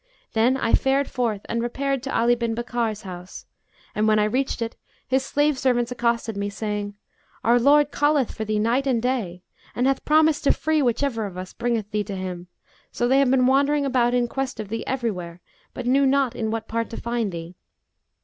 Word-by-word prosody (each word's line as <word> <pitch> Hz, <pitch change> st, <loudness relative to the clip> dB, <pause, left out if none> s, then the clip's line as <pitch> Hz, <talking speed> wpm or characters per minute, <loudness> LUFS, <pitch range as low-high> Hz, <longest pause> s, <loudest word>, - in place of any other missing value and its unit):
Then 235 Hz, +4 st, +3 dB
I 230 Hz, -, -1 dB
fared 270 Hz, +1 st, +3 dB
forth 230 Hz, -5 st, -1 dB
and 235 Hz, -, -2 dB
repaired 270 Hz, +3 st, -1 dB
to 270 Hz, +2 st, -2 dB
Ali 235 Hz, +1 st, +4 dB
bin 235 Hz, -1 st, -1 dB
Bakkar's 235 Hz, -2 st, -2 dB
house 180 Hz, -1 st, -9 dB, 0.5 s
and, 215 Hz, +1 st, +1 dB
when 215 Hz, 0 st, +4 dB
I 210 Hz, -, +3 dB
reached 255 Hz, +7 st, -1 dB
it, 230 Hz, -, -5 dB, 0.3 s
his 265 Hz, +1 st, +1 dB
slave 290 Hz, 0 st, +1 dB
servants 245 Hz, -2 st, +1 dB
accosted 235 Hz, -2 st, -1 dB
me, 200 Hz, 0 st, -2 dB
saying, 205 Hz, 0 st, -4 dB, 0.5 s
'Our 240 Hz, +2 st, +4 dB
lord 290 Hz, +3 st, +4 dB
calleth 290 Hz, -3 st, +2 dB
for 220 Hz, -, -4 dB
thee 215 Hz, 0 st, -1 dB
night 235 Hz, +6 st, +1 dB
and 250 Hz, -3 st, +2 dB
day, 225 Hz, -8 st, -2 dB, 0.3 s
and 245 Hz, -, +1 dB
hath 270 Hz, 0 st, +1 dB
promised 310 Hz, -1 st, +3 dB
to -, -, +5 dB
free 310 Hz, +1 st, 0 dB
whichever 240 Hz, -3 st, 0 dB
of 185 Hz, -2 st, -10 dB
us 185 Hz, 0 st, -7 dB
bringeth 230 Hz, -3 st, -2 dB
thee 210 Hz, -1 st, 0 dB
to 200 Hz, -1 st, -5 dB
him; 180 Hz, -2 st, -5 dB, 0.4 s
so 240 Hz, -, 0 dB
they 265 Hz, +2 st, +4 dB
have 275 Hz, -2 st, +3 dB
been 255 Hz, -1 st, +4 dB
wandering 280 Hz, +2 st, +3 dB
about 250 Hz, -2 st, +2 dB
in 245 Hz, -1 st, +2 dB
quest 270 Hz, -1 st, -4 dB
of 210 Hz, -2 st, -5 dB
thee 225 Hz, +2 st, -3 dB
everywhere 185 Hz, -10 st, -3 dB, 0.4 s
but 250 Hz, -, -5 dB
knew 270 Hz, +2 st, +3 dB
not 270 Hz, -2 st, +2 dB
in 220 Hz, -1 st, -2 dB
what 225 Hz, 0 st, -3 dB
part 230 Hz, 0 st, -2 dB
to 230 Hz, -, -7 dB
find 235 Hz, -3 st, -2 dB
thee. 170 Hz, 0 st, -7 dB
240 Hz, 205 wpm, -24 LUFS, 215-265 Hz, 0.5 s, to